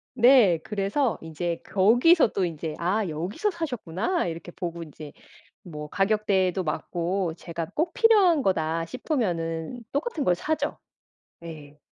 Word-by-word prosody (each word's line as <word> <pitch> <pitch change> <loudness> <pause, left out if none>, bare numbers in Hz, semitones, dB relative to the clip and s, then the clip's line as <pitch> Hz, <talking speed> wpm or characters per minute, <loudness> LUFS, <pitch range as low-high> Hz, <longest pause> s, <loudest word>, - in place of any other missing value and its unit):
네. 240 -8 +6
그래서 210 +5 -1
인제 165 +1 -4
거기서 240 - +4
또 195 - -1
인제 160 -2 -3
'아 190 +4 0
여기서 185 - -2
사셨구나.' 290 - -2
이렇게 170 +1 -6
보고 170 -2 -5
인제 150 -1 -11 0.5
뭐 150 -4 -7
가격대도 195 -2 +1
맞고 175 +2 -2
제가 165 -2 -6
'꼭 325 +8 0
필요한 415 - +5
거다.' 165 -4 0
싶으면은 180 - -3
똑같은 300 - -2
걸 180 - +3
사죠. 310 - -2 0.6
네. 150 -3 -11
185 Hz, 265 characters per minute, -26 LUFS, 165-250 Hz, 0.6 s, 네